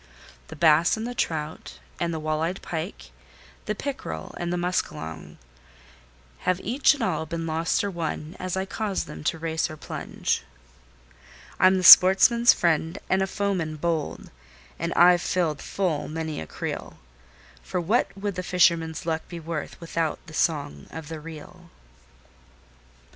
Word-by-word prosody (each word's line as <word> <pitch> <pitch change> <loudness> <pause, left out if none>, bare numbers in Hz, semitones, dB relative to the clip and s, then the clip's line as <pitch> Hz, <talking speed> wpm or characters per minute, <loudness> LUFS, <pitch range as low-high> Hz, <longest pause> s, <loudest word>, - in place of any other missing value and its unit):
The 160 - -9
bass 160 +4 +4
and 220 - -4
the 245 - -4
trout, 155 -8 -3 0.2
and 170 -1 -1
the 160 - -3
wall 155 0 -1
eyed 175 +4 -2
pike, 165 +3 -6 0.6
the 210 - -1
pickerel 280 +7 -5
and 175 0 -2
muskalonge, 175 - -3 1.0
Have 185 0 0
each 265 +6 +3
and 275 - -4
all 160 -5 -1
been 165 0 -4
lost 165 +4 0
or 200 - -2
won 165 -1 -4
as 185 0 -3
I 190 - -1
caused 205 0 -2
them 75 0 -9
to - - 0
race 160 0 -1
or 155 - -8
plunge, - - -3 1.2
I'm 185 +1 +5
the 185 - -1
sportsman's 195 +7 +9
friend, 165 -1 +1
and 190 0 +3
a 190 - +1
foeman 190 -6 -2
bold, 160 -1 -3 0.5
and - - -2
I've 175 0 +6
filled 165 -6 -1
full 180 -7 -2
many 160 - -4
a 80 - -7
creel; - - -6 0.6
For 180 - -3
what 200 +8 +2
would 200 0 -3
the 185 - -3
fisherman's 170 -3 +2
luck 160 -1 -2
be 170 - -7
worth 160 -2 -5
without 165 -2 -2
the 155 - -12
song 140 - -1
of 160 -2 -8
the 160 -1 -6
reel? 165 +2 -11
170 Hz, 155 wpm, -25 LUFS, 160-185 Hz, 1.2 s, sportsman's